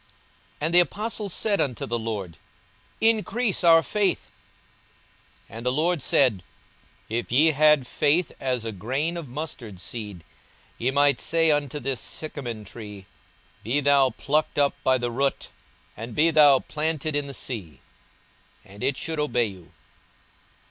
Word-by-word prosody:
42:017:005 - - -35 0.5
And 160 +3 0
the 175 - +8
apostles 205 +4 -1
said 205 -2 +1
unto 125 -5 -2
the 120 +1 -2
Lord, 100 -7 -5 0.6
Increase 225 -1 +1
our 165 -1 +7
faith. 205 +1 -1 1.2
42:017:006 - - -13
And 115 - -8
the - - +3
Lord 160 +4 +1
said, 120 -9 +2 0.6
If 115 +2 -3
ye 150 +6 +5
had 150 -2 +4
faith 150 +7 +1
as 125 -4 -2
a 115 - -2
grain 130 - -2
of 170 -4 -6
mustard 120 - -6
seed, 105 -4 -7 0.6
ye 120 - +1
might 140 -1 +3
say 165 -1 +2
unto 145 -1 -1
this 135 -4 -3
sycamine 120 -8 -6
tree, 105 -2 -10 0.6
Be 120 +7 +1
thou 140 -2 +4
plucked 150 +4 -1
up 145 -1 +3
by 130 0 +3
the 120 -1 -2
root, 135 +3 -1 0.5
and 115 +2 -7
be 165 +2 +4
thou 145 -3 +7
planted 155 -1 -2
in 145 -1 -1
the 140 - -7
sea; 90 - -6 0.9
and 100 0 -14
it 135 +1 0
should 160 -2 -4
obey 125 -5 +1
you. 95 -5 -10
140 Hz, 150 wpm, -25 LUFS, 115-155 Hz, 1.2 s, the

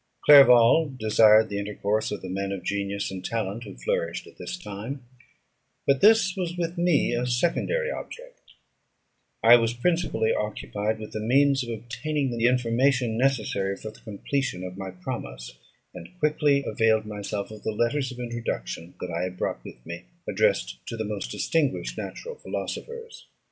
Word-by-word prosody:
Clerval 135 +1 +7
desired 110 -1 +5
the 100 0 -3
intercourse 105 +1 -1
of 105 - -5
the - - -5
men 95 +1 -3
of 95 -2 -5
genius 100 +1 -2
and 95 -1 -6
talent 110 +1 -3
who - - -10
flourished - - -2
at - - -16
this 180 - -5
time; 120 - -7 0.8
but 140 -1 +2
this 210 -2 +5
was 175 -2 -3
with 170 0 -2
me 170 -7 +2
a 120 +1 -1
secondary 175 - 0
object; - - -9 1.0
I 115 +2 +9
was 115 0 0
principally 155 -5 +1
occupied 105 0 -2
with 110 -1 -8
the 110 - -4
means 135 +4 +3
of 120 - -7
obtaining 120 +4 -3
the 115 0 +3
information 125 0 +2
necessary 110 -6 0
for 110 - -7
the - - -18
completion 115 -1 -3
of 90 0 -6
my 95 0 -6
promise, 90 -9 -7 0.3
and - - -10
quickly 150 -3 +2
availed 110 -2 +2
myself 105 -1 -5
of 110 -1 -10
the - - -3
letters 130 +5 0
of 125 - -9
introduction 115 - -5
that 90 - -4
I 85 +1 -2
had 90 0 -4
brought - - -3
with - - -12
me, - - -7 0.2
addressed - - +1
to 115 - -5
the 110 - -2
most 105 - -4
distinguished 145 - -1
natural 480 +1 -6
philosophers. 465 0 -7
115 Hz, 165 wpm, -26 LUFS, 105-140 Hz, 1.0 s, I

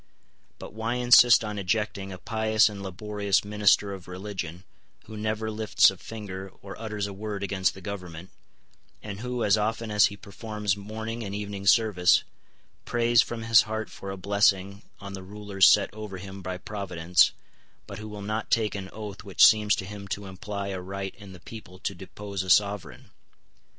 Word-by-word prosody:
But - - -10
why 110 +2 -2
insist 120 -1 +7
on 105 -1 -4
ejecting 100 0 -2
a 95 - -7
pious 110 +2 +2
and 100 -1 -8
laborious 100 +1 -1
minister 105 -1 +3
of 95 -2 -10
religion, 90 -2 -6 0.4
who 110 - -10
never 110 +1 -2
lifts 110 -1 +4
a - - -11
finger 95 -4 -7
or 100 0 -8
utters 105 -2 -3
a 100 - -6
word 100 0 -5
against 95 -1 0
the 95 - -11
government, 90 -3 -7 0.7
and 105 -2 -6
who, 125 0 -3
as 105 +1 +4
often 110 +1 -2
as 105 -2 +5
he 100 - -9
performs 105 -1 -3
morning 110 +3 -6
and 100 -1 -5
evening 100 -1 -5
service, 100 -5 +4 0.6
prays 120 0 +3
from 115 0 -5
his 115 0 +6
heart 110 0 -4
for 100 - -8
a 95 - -5
blessing 100 0 +1 0.2
on 100 -1 -8
the 95 - -6
rulers 100 0 +2
set - - +4
over 105 -3 -7
him 95 +1 -9
by 95 0 -4
Providence, 90 -4 +1 0.5
but - - -8
who 110 - -7
will 105 -1 -7
not 110 +2 -3
take 110 -2 +2
an 95 -2 -6
oath 105 -3 -8
which 100 - +5
seems 105 -2 +5
to 95 - -5
him 100 0 -8
to 100 +1 -4
imply 100 +1 -5
a 95 -2 -4
right 95 +1 -5
in 100 -3 -13
the 90 - -12
people 95 -1 -11
to 95 - -3
depose 100 +1 -6
a 95 - -6
sovereign? 100 +1 +1
100 Hz, 180 wpm, -27 LUFS, 95-110 Hz, 0.7 s, insist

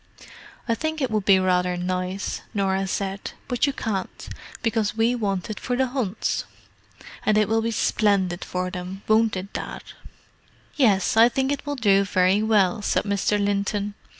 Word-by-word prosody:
"I 230 - +2
think 315 +6 -2
it 265 -5 -1
would 215 -3 0
be 195 -2 +6
rather 180 -1 +1
nice," 185 +2 -3
Norah 195 -1 0
said. 195 +1 -3
"But 245 +2 +1
you 280 - -1
can't, 200 -8 -4 0.3
because 220 -2 0
we 225 +2 +3
want 200 -4 -2
it 210 - -6
for 250 - -2
the 265 +1 +2
Hunts. 245 -6 -2 0.8
And 215 0 +2
it 215 -1 +3
will 225 +1 +1
be 230 - -1
splendid 200 -5 +1
for 180 0 -3
them, 185 +2 -7
won't 220 -1 +3
it, 190 +2 -7
Dad?" - - -5 0.9
"Yes, 210 -10 +3
I 230 +2 +7
think 265 +2 0
it 285 +1 -4
will 290 - -1
do 200 -6 +3
very 190 +1 +2
well," 210 -3 +2
said - - +1
Mr. 200 0 0
Linton. 205 0 -1
205 Hz, 170 wpm, -24 LUFS, 190-225 Hz, 0.9 s, I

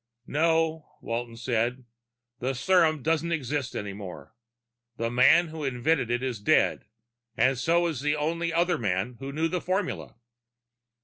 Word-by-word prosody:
"No," 160 +1 0
Walton 115 0 -4
said. 120 +1 -1 0.6
"The 130 +2 -2
serum 160 -2 +3
doesn't 165 +1 0
exist 145 -4 -2
any 100 -1 -4
more. 95 +1 -9 0.6
The 115 0 -1
man 130 +7 +5
who 155 -1 -6
invented 135 0 0
it 120 +1 0
is 125 -5 -2
dead, 105 - +2 0.5
and 130 +1 +3
so 170 +7 +2
is 155 -7 -2
the 150 +1 +1
only 165 +3 -1
other 170 -1 +1
man 105 +3 -1
who 135 +1 -5
knew 160 +3 0
the 180 +1 -2
formula." 185 +1 -2
145 Hz, 145 wpm, -27 LUFS, 120-165 Hz, 0.6 s, man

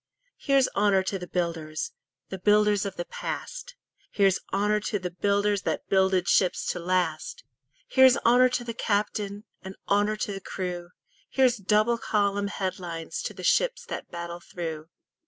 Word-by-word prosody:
Here's 275 -2 +3
honour 200 -2 +3
to 195 0 -3
the 180 - -7
builders 165 -3 -3 0.2
– 130 -1 -58
The 190 - -5
builders 210 +1 +3
of 195 - -6
the 175 - -4
past; - - -6 0.3
Here's 195 -2 +2
honour 210 +2 +2
to 210 0 -2
the 180 -2 -5
builders 200 +2 +1
That - - -3
builded 190 -2 +3
ships 180 0 +2
to 180 - -5
last; 180 - -1 0.4
Here's 260 -1 +6
honour 250 +2 +6
to 250 -1 -2
the 235 -1 -5
captain, 205 -1 -1 0.2
And 190 0 -8
honour 205 +1 +2
to 210 - -3
the 195 - -6
crew; 180 -2 -5 0.4
Here's 255 -2 +3
double 215 +4 +2
column 200 -2 0
headlines 175 -5 -4
To - - -5
the - - -9
ships - - +2
that - - -5
battle 170 0 -6
through. 160 -3 -6
200 Hz, 160 wpm, -27 LUFS, 180-210 Hz, 0.4 s, Here's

